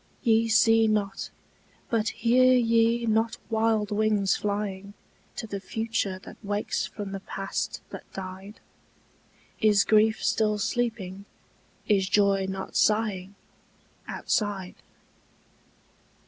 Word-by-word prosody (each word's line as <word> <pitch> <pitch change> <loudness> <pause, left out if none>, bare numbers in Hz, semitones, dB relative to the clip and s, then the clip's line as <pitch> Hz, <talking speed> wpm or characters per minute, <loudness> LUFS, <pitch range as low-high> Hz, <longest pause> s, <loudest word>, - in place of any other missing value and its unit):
Ye 230 -2 +3
see 225 0 +5
not, 205 -2 -1 0.6
but 225 -2 +1
hear 255 +2 +4
ye 230 0 +3
not 225 +1 +1
wild 220 -1 +1
wings 210 -2 +2
flying 200 -1 -3 0.4
To - - -5
the 200 -2 -5
future 215 -1 -2
that - - -13
wakes 205 +1 -2
from 205 -2 -7
the 195 - -4
past 195 0 -4
that - - -10
died? 190 +2 -8 1.0
Is 210 -2 +4
grief 220 0 +3
still 215 -1 +1
sleeping, 205 -4 -2 0.6
is 195 -3 +2
joy 200 -2 +3
not 190 0 -6
sighing 205 -3 +1 0.7
Outside? 200 -4 -2
210 Hz, 105 wpm, -26 LUFS, 195-225 Hz, 1.0 s, see